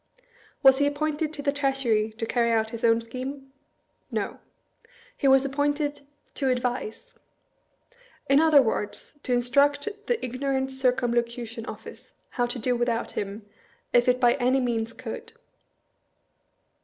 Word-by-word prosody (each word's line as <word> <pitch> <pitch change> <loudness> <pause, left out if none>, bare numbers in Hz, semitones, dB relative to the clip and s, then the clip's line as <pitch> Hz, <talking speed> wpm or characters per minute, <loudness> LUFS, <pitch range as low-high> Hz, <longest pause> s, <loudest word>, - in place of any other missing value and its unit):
Was 265 0 +7
he 285 - +3
appointed 305 +1 -1
to 290 -2 -7
the 280 - +2
Treasury 270 -6 0
to 225 - -2
carry 235 0 +1
out 220 -1 +1
his 230 -1 -7
own 230 0 +4
scheme? 265 +4 -7 0.6
No. - - -3 0.8
He 285 - 0
was 270 0 +6
appointed 290 +1 -1 0.2
" - - -42
to 270 - +2
advise." 250 - -2 1.1
In 275 +1 +5
other 310 -3 +6
words, 220 +5 -3
to 260 - -4
instruct 280 - +2 0.2
the 480 - 0
ignorant 265 +1 -2
Circumlocution 240 -2 -1
Office - - -10 0.2
how 245 -2 0
to 245 - -4
do 245 +1 0
without 240 -1 -1
him, 205 +1 -5 0.5
if 240 0 +4
it 250 0 +3
by 240 -1 +5
any 255 +2 +3
means 230 -3 -1
could. 455 - -8
255 Hz, 140 wpm, -26 LUFS, 235-280 Hz, 1.1 s, Was